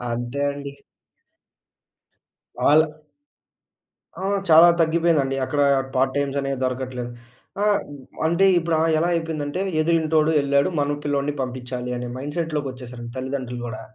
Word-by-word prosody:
అంతే 120 Hz, +3 st, -3 dB
అండి. 140 Hz, 0 st, -7 dB, 1.9 s
వాళ్ళ 155 Hz, +2 st, +6 dB, 1.4 s
ఆ! -, -, -4 dB, 0.3 s
చాలా 165 Hz, +2 st, +9 dB
తగ్గిపోయిందండి. 160 Hz, -4 st, +2 dB
అక్కడా 145 Hz, +1 st, +1 dB, 0.3 s
పార్టైమ్సనేవి 135 Hz, +1 st, 0 dB
దొరకట్లేదు. 125 Hz, -1 st, -3 dB, 0.5 s
ఆహ్, 210 Hz, -1 st, +3 dB, 0.5 s
అంటే, 170 Hz, +4 st, +3 dB
ఇప్పుడు 165 Hz, -1 st, -1 dB
ఆ -, -, +3 dB, 0.2 s
ఎలా 170 Hz, -, +1 dB
అయిపోయిందంటే, 160 Hz, +1 st, -3 dB, 0.2 s
ఎదురింటోడు 160 Hz, -1 st, +2 dB
వెళ్ళాడు. 140 Hz, +2 st, +2 dB
మన 145 Hz, 0 st, -1 dB
పిల్లోడిని 145 Hz, 0 st, -1 dB
పంపిచ్చాలి 125 Hz, -1 st, -5 dB
అనే 125 Hz, 0 st, -5 dB
మైండ్‌సెట్‌లోకొచ్చేశారండి 135 Hz, -5 st, -5 dB
తల్లిదండ్రులు 130 Hz, -2 st, -4 dB
గూడా. 120 Hz, +2 st, -6 dB
140 Hz, 105 wpm, -23 LUFS, 130-160 Hz, 1.9 s, చాలా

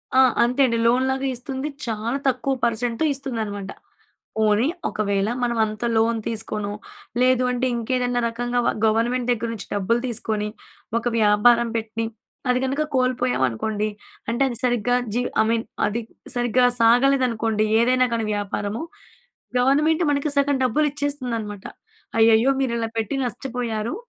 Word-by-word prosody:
ఆ! -, -, +6 dB, 0.2 s
అంతే 250 Hz, +3 st, +1 dB
అండి 230 Hz, -2 st, +1 dB
లోన్‌లాగా 265 Hz, +3 st, +1 dB
ఇస్తుంది. 265 Hz, +3 st, -4 dB, 0.2 s
చాలా 225 Hz, +3 st, -2 dB
తక్కువ 265 Hz, +1 st, +1 dB
పర్సెంట్‌ 235 Hz, 0 st, -1 dB
ఇస్తుందనమాట. 220 Hz, -8 st, -4 dB, 0.7 s
పోనీ 215 Hz, +4 st, +3 dB, 0.2 s
ఒకవేళ 200 Hz, -1 st, 0 dB
మనం 240 Hz, -1 st, 0 dB
అంత 215 Hz, +1 st, -6 dB
లోన్ 225 Hz, +1 st, +2 dB
తీసుకొనో, 215 Hz, -2 st, -3 dB, 0.5 s
లేదు 255 Hz, 0 st, +4 dB
అంటే 250 Hz, +1 st, 0 dB
ఇంకేదన్నా 245 Hz, +1 st, 0 dB
రకంగా 245 Hz, +1 st, -1 dB
వ -, -, +4 dB, 0.2 s
గవర్నమెంట్ 235 Hz, +3 st, +1 dB
దగ్గర 235 Hz, -1 st, 0 dB
నుంచి 210 Hz, -, -8 dB
డబ్బులు 205 Hz, +4 st, +1 dB
తీసుకొని, 220 Hz, -3 st, -2 dB, 0.5 s
ఒక 235 Hz, -, -9 dB
వ్యాపారం 225 Hz, +3 st, +4 dB
పెట్టి 225 Hz, 0 st, -3 dB, 0.5 s
అది 250 Hz, -, +3 dB
కనుక 275 Hz, +3 st, 0 dB
కోల్పోయామనుకోండి, 220 Hz, -, 0 dB, 0.4 s
అంటే 235 Hz, +3 st, 0 dB
అది 240 Hz, -, -5 dB
సరిగ్గా 245 Hz, 0 st, +2 dB, 0.2 s
జీ 240 Hz, -, 0 dB, 0.2 s
ఐ -, -, +1 dB
మీన్ 230 Hz, 0 st, 0 dB, 0.2 s
అది 215 Hz, +3 st, -1 dB, 0.4 s
సరిగ్గా 245 Hz, +1 st, +2 dB, 0.2 s
సాగలేదనుకోండి, 230 Hz, -3 st, +3 dB
ఏదైనా 255 Hz, +2 st, +3 dB
గానీ 225 Hz, -1 st, -1 dB
వ్యాపారము. 205 Hz, +2 st, -3 dB, 0.8 s
గవర్నమెంట్ 300 Hz, +6 st, +3 dB
మనకి 285 Hz, +1 st, 0 dB
సగం 280 Hz, 0 st, +3 dB
డబ్బులు 275 Hz, +5 st, +2 dB
ఇచ్చేస్తుందన్నమాట. 245 Hz, -9 st, -3 dB, 0.5 s
అయ్యయ్యో! 225 Hz, +3 st, +5 dB
మీరు 260 Hz, -3 st, 0 dB
ఇలా 225 Hz, -1 st, -1 dB
పెట్టి 220 Hz, +3 st, -2 dB
నష్టపోయారు, 240 Hz, 0 st, -3 dB
235 Hz, 130 wpm, -23 LUFS, 220-255 Hz, 0.8 s, ఆ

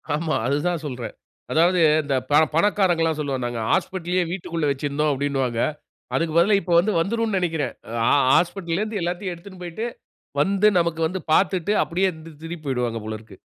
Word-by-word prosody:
ஆமா. 155 Hz, 0 st, -1 dB
அதுதான் 150 Hz, +4 st, 0 dB
சொல்றேன். 125 Hz, -4 st, -6 dB, 0.4 s
அதாவது 175 Hz, +3 st, +3 dB, 0.2 s
இந்த 140 Hz, -2 st, -1 dB
ப -, -, -1 dB, 0.2 s
பணக்காரர்கள்லாம் 170 Hz, -4 st, +2 dB
சொல்வாங்க, 135 Hz, -4 st, -2 dB
நாங்க 120 Hz, -1 st, -4 dB
"ஹாஸ்பிட்டல்லயே 185 Hz, -1 st, 0 dB
வீட்டிற்குள்ள 170 Hz, -4 st, -2 dB
வச்சிருந்தோம்" 145 Hz, +2 st, -1 dB
அப்பிடின்னுவாங்க 135 Hz, -4 st, -1 dB, 0.5 s
அதுக்குப் 165 Hz, -1 st, 0 dB
பதிலா 195 Hz, +5 st, +5 dB
இப்ப 180 Hz, -, -2 dB
வந்து 200 Hz, +5 st, +1 dB
வந்துருன்னு 220 Hz, +3 st, 0 dB
நினைக்கிறேன். 160 Hz, -7 st, -1 dB, 0.3 s
ஆ -, -, +2 dB
ஆ -, -, +4 dB, 0.2 s
ஹாஸ்பிட்டல்ல 175 Hz, +1 st, -1 dB
இருந்து 215 Hz, -1 st, -2 dB
எல்லாத்தையும் 175 Hz, +2 st, -2 dB
எடுத்துனு 185 Hz, +2 st, -13 dB
போயிட்டு, 175 Hz, +6 st, -4 dB, 0.6 s
வந்து 200 Hz, +5 st, +3 dB
நமக்கு 170 Hz, -1 st, -1 dB
வந்து 185 Hz, +3 st, -4 dB
பார்த்துட்டு 185 Hz, +2 st, +2 dB
அப்பிடியே 185 Hz, +3 st, 0 dB
இருந் 160 Hz, -2 st, -13 dB, 0.2 s
திருப்பி 165 Hz, +2 st, -6 dB
போயிடுவாங்க 125 Hz, -4 st, -1 dB
போல 110 Hz, 0 st, -4 dB
இருக்கு. 110 Hz, -3 st, -16 dB
170 Hz, 160 wpm, -23 LUFS, 145-185 Hz, 0.6 s, பதிலா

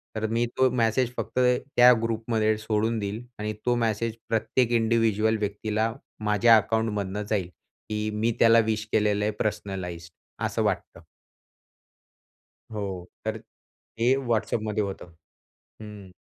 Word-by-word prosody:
तर 110 Hz, 0 st, -1 dB
मी 115 Hz, +2 st, +1 dB
तो 130 Hz, 0 st, +4 dB
मेसेज 120 Hz, 0 st, +1 dB
फक्त -, -, -2 dB
त्या 125 Hz, 0 st, +5 dB
ग्रुपमध्ये 110 Hz, -1 st, 0 dB
सोडून 110 Hz, +1 st, 0 dB
देईल 105 Hz, +3 st, -4 dB, 0.2 s
आणि 105 Hz, 0 st, -2 dB
तो 120 Hz, 0 st, +3 dB
मेसेज 115 Hz, -1 st, -1 dB
प्रत्येक 115 Hz, +2 st, +1 dB
इंडिव्हिज्युअल 110 Hz, -1 st, +2 dB
व्यक्तीला 105 Hz, +2 st, -1 dB, 0.3 s
माझ्या 105 Hz, +2 st, +5 dB
अकाउंटमधनं 105 Hz, -2 st, -1 dB
जाईल, 100 Hz, -5 st, 0 dB, 0.4 s
की 105 Hz, 0 st, -2 dB
मी 110 Hz, +2 st, +1 dB
त्याला 115 Hz, 0 st, +6 dB
विश 110 Hz, 0 st, -2 dB
केलेलं 105 Hz, -1 st, +2 dB
आहे 105 Hz, -, +1 dB
पर्सनलाइज्ड. 90 Hz, -5 st, -4 dB, 0.3 s
असं -, -, -1 dB
वाटतं. -, -, -2 dB, 1.7 s
हो. 95 Hz, -4 st, -4 dB, 0.2 s
तर -, -, -1 dB
ते 120 Hz, +3 st, -3 dB
WhatsAppमध्ये 110 Hz, -2 st, 0 dB
होतं. 95 Hz, -3 st, -6 dB, 0.7 s
हं. 105 Hz, -3 st, -10 dB
110 Hz, 120 wpm, -26 LUFS, 105-115 Hz, 1.7 s, त्याला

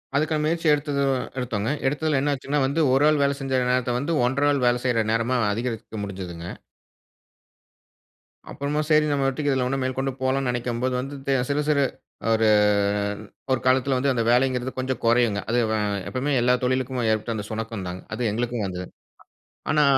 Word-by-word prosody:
அதுக்கான 155 Hz, +1 st, +1 dB
முயற்சி 165 Hz, +1 st, 0 dB
எடுத்தது 145 Hz, -1 st, 0 dB, 0.4 s
எடுத்தோங்க. 115 Hz, -3 st, -2 dB, 0.2 s
எடுத்ததுல 150 Hz, 0 st, +1 dB
என்ன 145 Hz, +1 st, +1 dB
ஆச்சுன்னா 140 Hz, +2 st, -2 dB
வந்து, 140 Hz, +5 st, 0 dB
1 140 Hz, +3 st, +4 dB
ஆள் 155 Hz, -2 st, +2 dB
வேல 140 Hz, 0 st, +1 dB
செஞ்ச 130 Hz, -2 st, 0 dB
நேரத்த 125 Hz, -1 st, +1 dB
வந்து 155 Hz, +5 st, -1 dB
1/2 140 Hz, +4 st, +2 dB
ஆள் 140 Hz, -3 st, 0 dB
வேலை 120 Hz, 0 st, +3 dB
செய்ற 120 Hz, -3 st, +2 dB
நேரமா 115 Hz, +3 st, +1 dB, 0.2 s
அதிகரிக்க 115 Hz, -1 st, -4 dB
முடிஞ்சதுங்க. 90 Hz, -4 st, -6 dB, 2.0 s
அப்புறமா 145 Hz, +2 st, -2 dB
சரி 155 Hz, -1 st, +5 dB
நம்ம 140 Hz, -2 st, +1 dB
பாட்டுக்கு 140 Hz, +2 st, 0 dB
இதுல 130 Hz, -2 st, +1 dB
இன்னும் 135 Hz, +1 st, -1 dB
மேற்கொண்டு 130 Hz, +1 st, -1 dB
போலாம்னு 130 Hz, 0 st, +1 dB
நினைக்கும்போது 120 Hz, +1 st, -1 dB
வந்து, 135 Hz, +3 st, -5 dB, 0.3 s
சிறு 145 Hz, +1 st, +1 dB
சிறு 145 Hz, -2 st, +3 dB, 0.5 s
1 110 Hz, 0 st, +3 dB, 1.0 s
1 130 Hz, -, +2 dB
காலத்தில 130 Hz, +1 st, +3 dB
வந்து 135 Hz, +2 st, +1 dB
அந்த 115 Hz, -2 st, 0 dB
வேலைங்கிறது 125 Hz, 0 st, +1 dB
கொஞ்சம் 130 Hz, 0 st, -2 dB
குறையுங்க, 115 Hz, -3 st, +3 dB
அது 120 Hz, -, +2 dB
வ -, -, +1 dB, 0.3 s
எப்பையுமே 135 Hz, +3 st, -1 dB
எல்லா 125 Hz, +1 st, +4 dB
தொழிலுக்கும் 130 Hz, -1 st, 0 dB
ஏற்பட்ட 110 Hz, +1 st, -1 dB
அந்த 105 Hz, -1 st, -4 dB
சுணக்கம் 110 Hz, -3 st, -4 dB
தாங்க, 90 Hz, +1 st, -6 dB
அது 120 Hz, -3 st, 0 dB
எங்களுக்கும் 120 Hz, -1 st, -2 dB
வந்தது. 90 Hz, 0 st, -5 dB, 0.8 s
ஆனா 150 Hz, 0 st, +4 dB
130 Hz, 160 wpm, -24 LUFS, 115-140 Hz, 2.0 s, சரி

